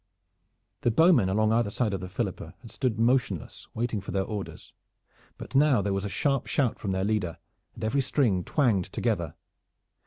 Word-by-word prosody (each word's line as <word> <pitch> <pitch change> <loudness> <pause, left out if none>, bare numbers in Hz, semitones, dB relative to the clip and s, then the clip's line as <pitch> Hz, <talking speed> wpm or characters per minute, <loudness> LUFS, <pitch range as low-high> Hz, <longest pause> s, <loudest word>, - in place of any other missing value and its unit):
The - - +2
bowmen 125 - +5
along 110 +3 +2
either 115 -2 +2
side 105 0 -1
of 95 - -2
the 90 - -6
Philippa 95 0 -4
had 115 - -11
stood 125 -5 -1
motionless 115 - 0
waiting 115 -2 -1
for 100 - -11
their 95 +1 0
orders, 100 0 -7 0.6
but - - -10
now 140 -3 +5
there 100 0 0
was 100 +1 -2
a - - -2
sharp 135 +5 0
shout 130 -6 0
from 100 - -2
their 95 0 0
leader, 100 -6 -1 0.4
and 115 - -8
every 130 +6 +1
string 120 -9 +1
twanged 115 - +1
together. - - -1
110 Hz, 180 wpm, -27 LUFS, 95-125 Hz, 0.6 s, bowmen